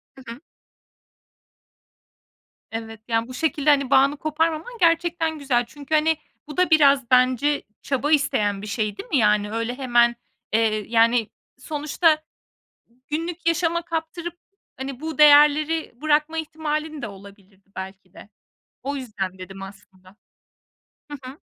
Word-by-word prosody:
Hı 265 - -14
hı. 235 - -13 2.3
Evet, 225 0 -6
yani, 230 -1 0
bu 255 - -9
şekilde, 300 +1 0
hani, 280 -3 +3
bağını 275 +2 +4
koparmaman 320 +9 -2
gerçekten 330 -2 +1
güzel. 250 -4 +1
Çünkü, 285 +5 -4
hani, 315 +1 +2 0.3
bu 300 - -9
da 365 0 +3
biraz 280 -6 +4
bence 255 +3 +3 0.2
çaba 280 +2 -1
isteyen 210 -9 +1
bir 210 - -7
şey, 210 -1 -2
değil - - -9
mi? 305 - +2
Yani, 210 -2 +2
öyle 230 +3 -3
hemen, 240 -2 +3 0.4
eee, 215 -2 +1
yani, 230 -1 +3 0.3
sonuçta 305 +3 +1 0.9
günlük 330 +2 -4
yaşama 335 0 +1
kaptırıp, 330 +1 -5 0.4
hani, 265 0 -6
bu 315 -2 -5
değerleri 300 +2 +5
bırakma 310 +1 +1
ihtimalin 310 -1 -4
de 235 - -4
olabilirdi 195 0 -16
belki 190 -1 -8
de. - - -14 0.6
O 280 +2 -3
yüzden 205 -8 -5
dedim 195 +1 -10
aslında. 195 -1 -13 1.0
Hı 290 - -5
hı. 275 +5 -13
275 Hz, 130 wpm, -23 LUFS, 225-310 Hz, 2.3 s, değerleri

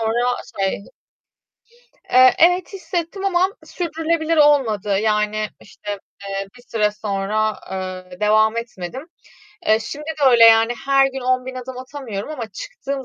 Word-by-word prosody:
sonra 240 +2 +1 0.2
şey 195 +1 -1 1.3
Eee, 255 0 +7
evet, 355 +3 +3
hissettim 370 0 -4
ama 370 -1 +3 0.2
sürdürülebilir 325 -1 -1
olmadı. 225 -10 +3
Yani, 215 0 0
işte, 205 0 -7 0.3
eee, 195 0 -4
bir - - -17
süre 210 -2 +1
sonra, 210 +1 -1 0.2
ııı, 185 -1 -6
devam 215 +1 +3
etmedim. 230 - -6 0.5
E, 215 0 +3
şimdi 290 +7 -7
de 310 -3 -2
öyle, 235 -2 +7
yani, 225 +1 +6
her 275 0 +5
gün 270 0 -5
10.000 255 0 -1
adım 255 0 -7
atamıyorum 255 -4 -6
ama 250 -7 -5
çıktığım 270 +7 -6
240 Hz, 135 wpm, -20 LUFS, 210-290 Hz, 1.3 s, Eee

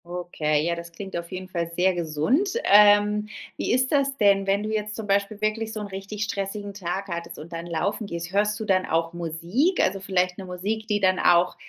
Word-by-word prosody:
Okay, 165 -4 -1
ja, 170 - +1
das 170 0 -8
klingt 190 +3 -8
auf 170 0 -5
jeden 185 0 -6
Fall 170 -2 -3
sehr 185 +2 +3
gesund. 175 - 0
Ähm, 210 0 +5 0.3
wie - - -1
ist 255 +1 +2
das 275 -2 +1
denn, 200 -3 +3
wenn 200 +1 +2
du 215 - -3
jetzt 210 0 -2
zum 220 - -5
Beispiel 200 +1 0
wirklich 220 +1 -1
so 215 - -4
'n 210 - -4
richtig 195 +2 -5
stressigen 200 0 -4
Tag 195 0 -4
hattest 170 -2 -5
und 165 +3 -10
dann 165 +1 -5
laufen 200 +6 -2
gehst? 170 -1 -5
Hörst 210 +2 +1
du 220 - -4
dann 185 -2 +2
auch 165 +1 0
Musik? 175 - 0
Also 195 +1 +2
vielleicht 185 -1 0
'ne 190 - -6
Musik, 200 +5 -3
die 210 -2 +1
dann 185 -1 +3
auch, 175 0 +4
195 Hz, 215 wpm, -25 LUFS, 170-210 Hz, 0.3 s, Ähm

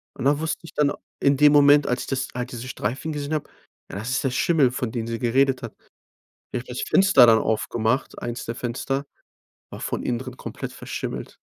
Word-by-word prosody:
Und - - -5
da 145 +1 +3
wusste 160 0 -2
ich 165 - -12
dann 145 -1 +2 0.3
in 140 -1 +3
dem 150 0 +6
Moment, 145 0 +6
als 125 0 0
ich - - -7
das 130 -1 -1
als 125 +1 -4
diese 120 0 -6
Streifen 130 +6 -3
gesehen 145 0 -4
habe. 155 - -2 0.4
Ja, - - -5
das 110 +5 -4
ist 130 - 0
der 135 - +1
Schimmel, 140 -1 +3
von 125 -2 -3
dem 115 -1 -3
sie 115 0 -3
geredet 130 +2 +2
hat. 115 - -6 0.8
Ich - - -1
habe 125 - -12
das 125 - -4
Fenster 190 -10 +6
dann 115 -1 +6
aufgemacht. 110 +3 -1
Eins 120 0 -4
der 115 - -4
Fenster 135 +3 -3 0.7
war - - -8
von - - -3
innen 120 -1 -1
drin 130 -1 -8
komplett - - -7
verschimmelt. - - -6
130 Hz, 215 wpm, -24 LUFS, 120-145 Hz, 0.8 s, dem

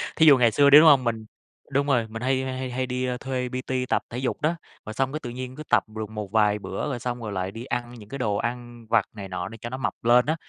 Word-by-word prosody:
Thí 160 - +4
dụ 145 -3 +8
ngày 120 -2 +4
xưa 140 +5 +5
đi, 145 +1 +10
đúng 160 - +7
hông? 140 -4 +7
Mình 115 -2 -2 0.5
đúng 140 +1 +1
rồi, 120 -5 +2
mình 110 +1 -7
hay 130 +1 +1
hay 130 -1 -4
hay 130 -1 -4
hay 130 +1 -1
đi, 125 0 -2
a, 125 -1 -2
thuê 130 -1 -3
PT 130 0 -2
tập - - +2
thể 120 - -6
dục 130 0 -2
đó, 160 +3 +1 0.3
rồi 110 - -6
xong 135 +3 -1
cái 155 - -2
tự 125 - -7
nhiên 125 +1 -6
cứ 155 - -7
tập - - +4
được 110 -1 -6
một 105 -3 -6
vài 105 -1 +3
bữa, 150 - -4
rồi 125 -4 -3
xong 125 0 -4
rồi 110 - -5
lại 95 -1 -3
đi 115 +4 -8
ăn 120 -2 -3
những 105 -4 -12
cái 140 - -5
đồ 105 -5 0
ăn 120 +1 -5
vặt - - +3
này 100 -2 -7
nọ 90 0 -4
để 115 - -10
cho 120 - -5
nó 130 - -5
mập 125 -4 -2
lên 120 +1 +5
á. 155 +2 +1
125 Hz, 305 wpm, -25 LUFS, 110-130 Hz, 0.5 s, đi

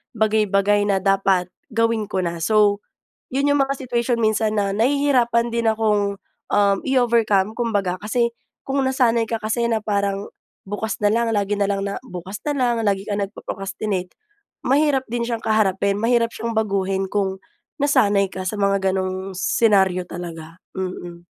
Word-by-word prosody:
bagay-bagay 205 -1 +2
na 195 -1 +1
dapat, 195 -2 +2 0.2
gawin 230 -2 0
ko 190 -1 -1
na. 170 -1 -3
So, 205 +3 +3 0.5
'yon 275 +2 +1
'yong 285 -1 +3
mga 275 0 -3
situation 235 0 0
minsan 215 -1 +1
na 195 -1 0
nahihirapan 245 -1 +2
din 230 -1 +2
akong, 210 -2 0 0.3
um, 200 -1 +3
i-overcome, 230 -6 +2
kumbaga. 205 -7 0
Kasi, 235 +2 0 0.3
kung 275 0 0
nasanay 240 -4 +2
ka 230 - 0
kasi 220 +2 -2
na 225 - +2
parang, 200 -1 -1 0.4
"Bukas 205 +1 -3
na 205 0 +2
lang", 235 0 +1
lagi 205 -2 0
na 200 -1 0
lang 195 0 -1
na 200 - -4
bukas 195 -2 -8
nalang, 250 -6 0
lagi 200 -2 0
ka 210 - -3
nagpo-procrastinate, 195 -1 -4 0.5
mahirap 275 0 +2
din 240 0 -3
siyang 235 -1 -2
kaharapin, 200 -2 +1
mahirap 230 0 +2
siyang 230 -1 -4
baguhin 195 -2 0
kung, 190 -1 -1 0.4
nasanay 250 -9 +3
ka 185 - -5
sa 200 - -2
mga 195 -1 +1
gano’ng 185 0 -3
senaryo 190 -2 +2
talaga, 165 -2 -8 0.2
mm. 175 -2 -6
210 Hz, 150 wpm, -21 LUFS, 195-235 Hz, 0.5 s, So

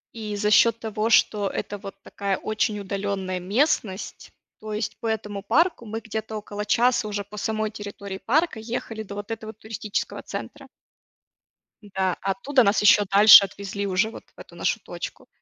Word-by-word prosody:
И 215 -2 -5
за 210 0 +1
счёт 230 +2 +5
того, 220 0 -2
что 205 -2 +3
это 205 - -4
вот 195 -1 -9
такая 200 -1 -2
очень 215 -1 -1
удаленная 195 -2 -3
местность. 200 - -1 0.3
То 215 0 -7
есть 210 0 -3
по 230 - -4
этому 210 -2 -3
парку 275 - +2
мы 220 +1 -4
где-то 220 -1 -5
около 210 0 -6
часа 240 +1 +2
уже 205 -1 -3
по 210 +1 -12
самой 215 +1 -1
территории 200 -2 -7
парка 295 - +1
ехали 225 -1 -5
до 200 -1 -9
вот 205 +2 -7
этого 220 -1 -6
туристического 215 -1 -4
центра. - - -8 1.1
Н-да, 190 -3 -1
а 195 - 0
оттуда 255 +5 +2
нас 200 0 +3
ещё 210 0 +6
дальше 200 +1 +9
отвезли 200 +1 -5
уже 195 +4 +1
вот - - -10
в - - -18
эту - - -13
нашу - - 0
точку. - - -8
210 Hz, 170 wpm, -24 LUFS, 200-220 Hz, 1.1 s, дальше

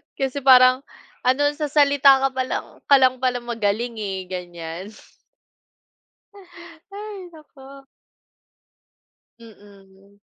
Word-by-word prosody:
Kasi 270 0 -3
parang, 255 0 +6 0.4
ano 255 +3 +2 0.2
sa 305 - -2
salita 280 -2 +4
ka 270 - +1
pa 260 0 -2
lang - - -4 0.2
ka 280 - +5
lang 255 0 +3
pala 250 -1 -1
magaling 230 0 -3
eh, 195 -2 -4
ganyan. 175 +1 -8 2.0
Hay, 400 -3 -9
naku. 275 -3 -16 1.6
Mm. 200 -2 -19
255 Hz, 100 wpm, -21 LUFS, 205-275 Hz, 2.0 s, parang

